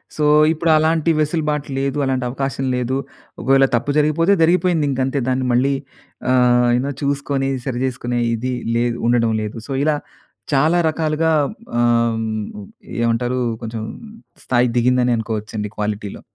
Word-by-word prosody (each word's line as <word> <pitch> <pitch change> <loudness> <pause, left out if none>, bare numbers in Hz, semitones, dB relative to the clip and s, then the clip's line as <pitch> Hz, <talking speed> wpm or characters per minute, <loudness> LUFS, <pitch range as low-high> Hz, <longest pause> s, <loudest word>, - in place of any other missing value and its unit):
So, 150 - -1 0.3
ఇప్పుడు 165 +1 -1
అలాంటి 160 +1 +2
వెసులుబాటు 150 -1 -1
లేదు. 135 +1 -1
అలాంటి 130 -1 -1
అవకాశం 135 +1 -3
లేదు. 125 +1 -1 0.5
ఒకవేళ 135 +1 +4
తప్పు 120 +5 -1
జరిగిపోతే 160 +6 +3
జరిగిపోయింది. 170 -1 +3
ఇంక 135 -1 -2
అంతే 135 +1 -1
దాన్ని 130 0 0
మళ్ళీ 130 +3 +2 0.6
ఆహ్, 125 -1 +4
అయినా 125 +3 +1
చూసుకొని 140 -1 -1 0.2
సరిచేసుకునే 125 -1 -2
ఇది 125 +3 -2 0.2
లేదు, 120 0 0
ఉండడం 115 -2 +2
లేదు. 105 -1 -5
సో, 140 - -7
ఇలా 155 -1 +2 0.6
చాలా 155 +5 +3
రకాలుగా 160 +1 0 0.5
ఆహ్, 115 -1 +2 0.8
ఏమంటారు 120 +2 0 0.2
కొంచెం 110 -1 -5 0.6
స్థాయి 125 0 +2
దిగిందని 125 0 +2
అనుకోవచ్చండి 110 -1 -4
క్వాలిటీ‌లో. 105 -1 -4
130 Hz, 130 wpm, -19 LUFS, 120-150 Hz, 0.8 s, ఒకవేళ